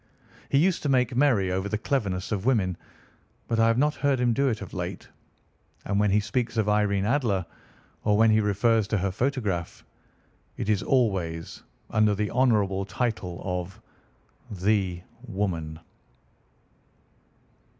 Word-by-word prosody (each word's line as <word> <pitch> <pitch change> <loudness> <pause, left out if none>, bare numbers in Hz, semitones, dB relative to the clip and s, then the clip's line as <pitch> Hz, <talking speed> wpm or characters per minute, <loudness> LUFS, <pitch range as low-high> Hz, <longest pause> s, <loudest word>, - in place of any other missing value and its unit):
He 140 - +2
used 175 +5 +2
to 145 - -1
make 125 -2 +2
merry 120 -9 +3
over 95 +2 -2
the 105 - -1
cleverness 100 -7 -2
of 100 -3 -1
women, 100 -9 +2 0.7
but 115 - 0
I 115 - +5
have 115 0 +2
not 150 +3 +2
heard 140 -3 0
him 120 -1 +2
do 140 +4 +1
it 115 -4 0
of - - -10
late. - - -5 0.8
And 100 0 0
when 105 0 +3
he 100 +2 +3
speaks 115 +3 -2
of 110 -2 +1
Irene 105 -2 +2
Adler, 110 -7 +1 0.6
or 105 -1 +3
when 110 0 +5
he 110 0 +4
refers 105 +1 +2
to 105 - 0
her 95 0 -1
photograph, 105 -7 -2 0.7
it - - -3
is 105 -3 +2
always 95 -10 -1 0.3
under 110 -1 +3
the 105 +1 -2
honourable 105 -6 +2
title 95 -3 -3
of 90 0 -4 0.7
the 95 -2 0 0.2
woman. 80 -5 -3
105 Hz, 150 wpm, -26 LUFS, 95-120 Hz, 0.8 s, I